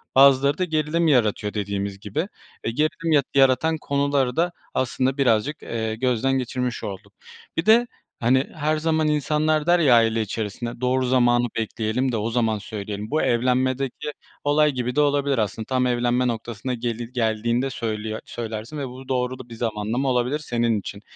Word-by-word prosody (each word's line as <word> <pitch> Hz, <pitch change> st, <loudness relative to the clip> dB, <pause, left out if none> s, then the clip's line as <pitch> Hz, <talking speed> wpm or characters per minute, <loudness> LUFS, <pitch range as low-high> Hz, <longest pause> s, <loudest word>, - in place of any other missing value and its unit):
bazıları 140 Hz, +1 st, +6 dB
da 185 Hz, -, 0 dB
gerilim 160 Hz, 0 st, 0 dB
yaratıyor 110 Hz, -7 st, +2 dB
dediğimiz 100 Hz, -1 st, -3 dB
gibi, 155 Hz, -, -3 dB, 0.4 s
eee, 115 Hz, -, 0 dB
gerilim 155 Hz, +5 st, -1 dB
yat 145 Hz, -3 st, +4 dB
yaratan 135 Hz, +4 st, +4 dB
konuları 140 Hz, -3 st, +1 dB
da 175 Hz, +2 st, +1 dB, 0.2 s
aslında 130 Hz, +1 st, 0 dB
birazcık, 135 Hz, +2 st, +1 dB
eee, 110 Hz, -1 st, -3 dB
gözden 125 Hz, +2 st, +1 dB
geçirmiş 125 Hz, 0 st, -3 dB
olduk. 95 Hz, -2 st, -7 dB, 0.4 s
Bir 165 Hz, -, 0 dB
de, 235 Hz, +2 st, +5 dB, 0.3 s
hani, 130 Hz, +3 st, +2 dB
her 155 Hz, +1 st, 0 dB
zaman 160 Hz, 0 st, +1 dB
insanlar 150 Hz, +1 st, +1 dB
der 175 Hz, 0 st, +5 dB
ya 140 Hz, -7 st, +5 dB
aile 115 Hz, -1 st, +3 dB
içerisinde 110 Hz, +3 st, -4 dB
"Doğru 130 Hz, +1 st, +1 dB
zamanı 120 Hz, -1 st, +3 dB
bekleyelim 115 Hz, +3 st, -1 dB
de 115 Hz, -, -1 dB
o 110 Hz, +2 st, -1 dB
zaman 115 Hz, -2 st, +1 dB
söyleyelim." 105 Hz, +1 st, -6 dB
Bu 155 Hz, -, +2 dB
evlenmedeki 130 Hz, +4 st, 0 dB, 0.3 s
olay 150 Hz, +1 st, +3 dB
gibi 125 Hz, -2 st, -3 dB
de 150 Hz, -, +4 dB
olabilir 140 Hz, -2 st, +2 dB
aslında, 110 Hz, +1 st, -2 dB
tam 130 Hz, 0 st, +1 dB
evlenme 120 Hz, +1 st, +1 dB
noktasına 115 Hz, +1 st, -3 dB
geli 120 Hz, 0 st, -4 dB
geldiğinde 115 Hz, +2 st, 0 dB
söylüyor 110 Hz, -2 st, -3 dB
söylersin 115 Hz, +4 st, -6 dB
ve 140 Hz, -2 st, -3 dB
bu 130 Hz, +1 st, -11 dB
doğru 130 Hz, 0 st, -1 dB
da 125 Hz, -2 st, -11 dB
bir 115 Hz, -, -8 dB
zamanlama 115 Hz, +3 st, -1 dB
olabilir 125 Hz, +3 st, +1 dB
senin 120 Hz, -6 st, 0 dB
için. 100 Hz, +1 st, -8 dB
125 Hz, 165 wpm, -23 LUFS, 115-140 Hz, 0.4 s, bazıları